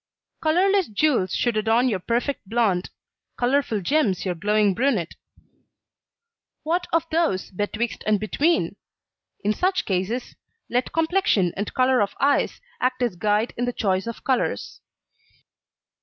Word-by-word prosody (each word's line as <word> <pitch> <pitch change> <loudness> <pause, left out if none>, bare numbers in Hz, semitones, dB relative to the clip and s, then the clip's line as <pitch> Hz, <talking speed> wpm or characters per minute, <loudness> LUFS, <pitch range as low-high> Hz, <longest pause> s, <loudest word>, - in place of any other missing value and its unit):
Colourless 375 +4 +3
jewels 220 -3 +1
should 240 -2 0
adorn 225 +3 +2
your 210 -6 0
perfect 235 +2 -2
blond, 210 -6 +1 0.5
colourful 245 -4 +1
gems 205 - +1
your 185 - 0
glowing 210 +3 +2
brunette. 230 -7 0 1.5
What 345 +3 -1
of 330 0 +2
those 320 - 0
betwixt 210 +4 -3
and 215 -1 +3
between? 295 - 0 0.7
In 210 +1 +2
such 370 - 0
cases 195 +6 -2 0.4
let 245 +1 0
complexion 325 - +2
and 205 +2 -3
colour 255 -2 +3
of 200 - -1
eyes 285 +1 +2 0.2
act 255 0 0
as 235 -7 0
guide 210 +5 0
in 245 - 0
the 245 - -2
choice 195 -1 0
of 230 - -6
colours. 260 -2 -1
235 Hz, 130 wpm, -24 LUFS, 205-280 Hz, 1.5 s, Colourless